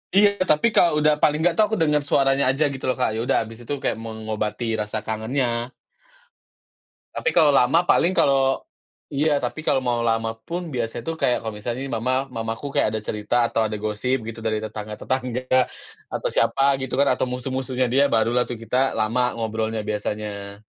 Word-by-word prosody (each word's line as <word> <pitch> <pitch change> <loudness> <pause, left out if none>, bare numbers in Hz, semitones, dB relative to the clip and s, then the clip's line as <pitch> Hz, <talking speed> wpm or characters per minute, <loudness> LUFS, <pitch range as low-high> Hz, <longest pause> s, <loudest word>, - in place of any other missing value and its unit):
Iya, 200 -1 +4
tapi 185 +6 +3
kalau 170 -3 +4
udah 150 -1 +3
paling 150 0 +4
nggak 175 - +4
tuh 215 - +4
aku 220 - 0
denger 150 -2 +2
suaranya 135 -1 +2
aja 135 +3 +2
gitu 135 - -8
loh, - - 0
Kak, 125 -4 0
ya 110 - -2
udah 120 - +1
abis 115 +1 -11
itu 120 +4 -4
kayak - - -2
mengobati 110 +1 -3
rasa 105 0 -4
kangennya. 115 +2 -1 1.5
Tapi - - 0
kalau 150 - +5
lama 135 +3 +4
paling 180 +3 +4
kalau 135 -3 +3 0.5
iya, 145 0 +2
tapi 155 - -4
kalau 130 - +2
mau 120 -2 0
lama 115 -1 +1 0.2
pun 175 +1 -3
biasa 120 -2 -3
tuh 165 - -1
kayak 125 - +3
kalau 110 -1 -5
misalnya 120 +4 -4
nih 135 - -5
mama, 120 +3 -1 0.2
mamaku 115 +3 -4
kayak - - +3
ada 110 - -2
cerita 105 +2 -2
atau 115 - 0
ada 110 0 -3
gosip 110 +5 0
gitu 115 0 -6
dari 110 -1 +1
tetangga 110 -1 -6
tetangga, 130 -1 -2 0.7
atau - - -1
siapa 135 - +2 0.2
gitu 130 - -5
kan 140 - +4
atau - - +1
musuh-musuhnya 130 0 -2
dia 140 +2 +5
barulah 115 +2 +3
tuh 120 - -4
kita 120 +3 -1 0.2
lama 110 +3 +1
ngobrolnya 110 -1 -2
biasanya. 105 -1 -4
125 Hz, 185 wpm, -23 LUFS, 110-140 Hz, 1.5 s, kalau